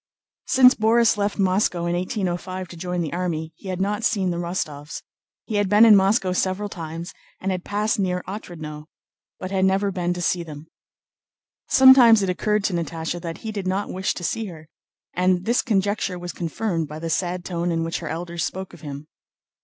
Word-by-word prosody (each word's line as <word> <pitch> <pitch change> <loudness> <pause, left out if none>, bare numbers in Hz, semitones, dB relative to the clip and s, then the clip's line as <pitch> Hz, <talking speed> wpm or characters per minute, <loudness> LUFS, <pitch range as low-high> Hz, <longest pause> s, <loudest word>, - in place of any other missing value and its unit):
Since 255 0 +7
Borís 225 +1 +3
left 205 -1 -1
Moscow 185 -3 +1
in 170 0 0
1805 185 0 -3
to - - -10
join 180 +1 -3
the 160 -2 -3
army 165 -3 -3
he 195 - -13
had 185 -1 -3
not 205 +3 -1
seen 190 -5 +1
the 170 - -3
Rostóvs. 155 -4 -4 0.4
He 215 - -2
had 205 -2 +1
been 210 +2 +7
in 220 -2 +8
Moscow 195 -1 +3
several 190 +3 -1
times, 165 0 -7 0.3
and 195 - -2
had 180 -1 -3
passed 210 +1 -1
near 180 -2 -1
Otrádnoe, 160 -6 -7 0.5
but 185 - -6
had 190 -1 +1
never 195 +1 +2
been 180 -2 -1
to - - -5
see 175 +1 +1
them. 155 -2 -9 1.0
Sometimes 255 -5 +8
it 190 - +1
occurred 210 +3 0
to 195 - 0
Natásha 165 0 -3
that 165 -1 -5
he 220 - -2
did 200 -3 -4
not 195 +2 -1
wish 190 +2 -1
to 175 - -7
see 225 +6 -1
her, 160 -4 -11 0.4
and 180 0 +1
this 235 +2 +2
conjecture 200 -4 0
was 175 0 -6
confirmed 170 -1 -2
by 150 +1 -8
the 165 +1 -4
sad 180 +1 -1
tone 175 -1 -2
in 165 -1 0
which 165 0 -3
her 165 - -6
elders 170 0 -4
spoke 190 0 -5
of - - -13
him. 145 -1 -7
185 Hz, 195 wpm, -23 LUFS, 170-200 Hz, 1.0 s, in